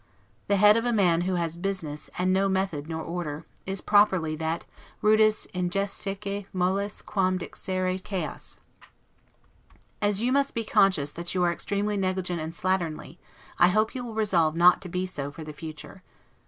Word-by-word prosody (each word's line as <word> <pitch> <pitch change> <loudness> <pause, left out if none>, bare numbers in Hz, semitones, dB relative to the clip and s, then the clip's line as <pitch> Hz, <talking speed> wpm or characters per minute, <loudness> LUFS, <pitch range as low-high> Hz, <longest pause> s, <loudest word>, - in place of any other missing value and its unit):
The 200 - +3
head 210 +2 +6
of 230 - 0
a - - +2
man 180 -6 +3
who 185 +1 0
has 170 -2 -1
business, 170 -6 -4
and 185 +1 +2
no 195 +1 +2
method 190 -6 -1
nor 160 -1 -3
order, 165 -3 -4 0.2
is 195 -1 -1
properly 190 -7 +3
that 160 +1 -3 0.3
'rudis 215 0 +4
indigestaque 195 +2 -2
moles 190 +3 -1
quam 185 -2 +1
dixere 185 +1 -3
chaos'. 190 -3 -4 1.4
As 205 -1 +2
you 240 +3 +1
must 280 +1 +1
be 230 - -1
conscious 185 -9 +3
that 170 +3 -5
you 180 - +2
are 175 -1 +3
extremely 205 +3 -1
negligent 185 -3 -1
and 160 +1 -4
slatternly, 175 -2 -2 0.4
I 175 - +7
hope 215 +4 +2
you 250 - -4
will 230 -2 -7
resolve 175 -8 +2
not 175 +1 +6
to 185 - -7
be 180 +2 -1
so 145 -6 -4
for 150 +3 -9
the 155 0 -8
future. 155 +2 -9
185 Hz, 170 wpm, -27 LUFS, 170-200 Hz, 1.4 s, I